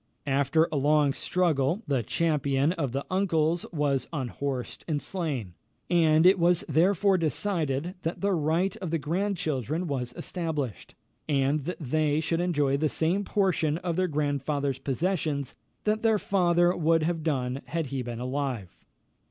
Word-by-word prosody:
After 140 +4 +2
a 150 - 0
long 145 0 +3
struggle, 170 - 0
the 140 -4 +1
champion 140 +1 +1
of 145 -8 -2
the 135 +2 -3
uncles 170 -3 +1
was 145 -5 0
unhorsed 135 -2 -4
and 155 -3 0
slain; 145 - -4 0.4
and 160 -2 +4
it 185 +1 +6
was 175 +3 +3
therefore 185 +5 +3
decided 165 -2 -1
that 165 +1 -3
the 200 0 +1
right 170 +4 +1
of 185 - -5
the 165 - +1
grandchildren 160 - -1
was 130 -6 -3
established, 155 - -4 0.3
and 140 0 +1
that 180 - -4
they 150 +1 +1
should 165 +1 0
enjoy 145 -6 +1
the 155 +1 +1
same 175 +7 0
portion 180 -7 +1
of 170 -1 -3
their 185 +1 +1
grandfather's 145 -2 -1
possessions 145 0 -1 0.3
that 215 +1 +1
their 225 -2 +3
father 175 -3 +2
would 165 -1 +2
have 165 0 -1
done 135 -4 -1
had 165 0 -2
he 135 - -1
been 120 -1 -5
alive. 130 -6 -4
155 Hz, 150 wpm, -27 LUFS, 140-175 Hz, 0.4 s, it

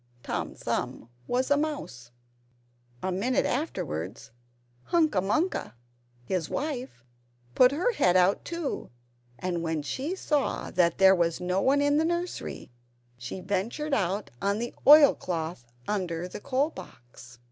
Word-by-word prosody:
Tom - - -3
Thumb 115 - -3 0.2
was 255 +3 0
a 285 - +5
mouse. 290 - -4 0.9
A 190 - 0
minute 220 +8 +1
afterwards, 145 - -3 0.5
Hunca 315 - +2
Munca, 310 - -1 0.5
his 175 +2 -2
wife, 265 - -4 0.5
put 255 0 +6
her 345 - +1
head 180 - +3
out, 185 +2 +3
too; 335 -4 -4 0.5
and 180 -2 -2
when 160 -2 -2
she 270 - -3
saw 300 -6 -1
that 170 -2 +2
there 190 0 +7
was 170 -3 +1
no 180 +2 0
one 275 +4 +3
in 285 0 +3
the 315 - +3
nursery, 345 - -3 0.4
she 120 +10 -7
ventured 220 +11 -2
out 200 -3 0
on 200 +1 +1
the 240 +2 -4
oilcloth 175 - +5 0.2
under 180 -4 -2
the 180 - -8
coal 275 +5 0
box. 120 - -13
200 Hz, 135 wpm, -28 LUFS, 170-285 Hz, 0.9 s, there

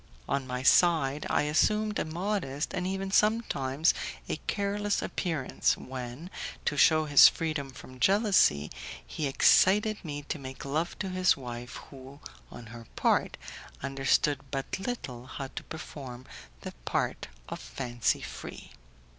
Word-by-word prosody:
On 135 -2 -1
my 125 0 -3
side 150 -2 +4
I - - +2
assumed 210 +8 +2
a - - -1
modest, 165 -4 -2
and 180 - -2
even 190 0 -3
sometimes 165 - +2 0.3
a - - -2
careless 205 0 0
appearance, 160 -8 -1
when, 130 +6 -7 0.3
to 150 - +1
shew 155 +2 +5
his 145 -2 +9
freedom 155 -5 -2
from 130 0 -12
jealousy, 190 - +3 0.3
he 150 - -3
excited 205 +9 +4
me 145 -3 -5
to 145 - -4
make 130 0 -8
love 155 +5 -2
to 190 - -3
his 185 0 +3
wife, 120 -2 -7 0.2
who, 135 +1 -12 0.3
on 120 - -10
her 115 -1 -10
part, - - +1 0.5
understood 135 +1 +1
but 135 +6 -3
little 130 - -5
how 135 0 -6
to - - -7
perform 130 -5 -8 0.4
the - - -6
part - - -1 0.2
of - - -6
fancy 120 - -1
free. - - -8
145 Hz, 140 wpm, -29 LUFS, 130-185 Hz, 0.5 s, his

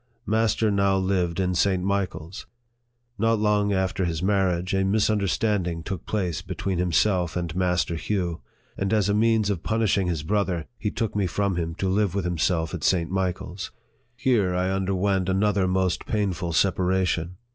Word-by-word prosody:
Master 110 0 +2
now 100 -1 +2
lived 95 -2 0
in 90 -1 +1
St. 90 +1 +1
Michael's. 95 -3 -3 0.7
Not 115 +1 +3
long 105 -1 +2
after 95 -1 0
his 85 -1 -2
marriage, 95 -2 +1
a - - +2
misunder 105 0 +2
standing 90 -6 0
took 95 -2 -5
place 90 -7 -1
between 95 0 -3
himself 90 +1 +1
and 85 -2 -3
Master 90 -2 +1
Hugh; 85 0 -2 0.3
and 95 +2 -1
as 105 -2 +2
a - - +2
means 110 -1 +2
of 90 -5 -3
punishing 110 -4 +1
his 80 -4 -2
brother, 95 -3 0
he 105 - -1
took 110 +1 -3
me 100 -2 +1
from 100 +2 0
him 85 -1 -2
to 95 - -2
live 100 0 +1
with 100 -3 -1
himself 85 -1 0
at - - -5
St. 85 -2 +1
Michael's. 95 0 -3 0.5
Here 105 -8 +1
I 90 +1 0
underwent 95 0 0
another 95 0 +2
most 90 -1 0
painful 95 -5 -1
separation. 90 -1 +1
95 Hz, 165 wpm, -25 LUFS, 90-100 Hz, 0.7 s, Not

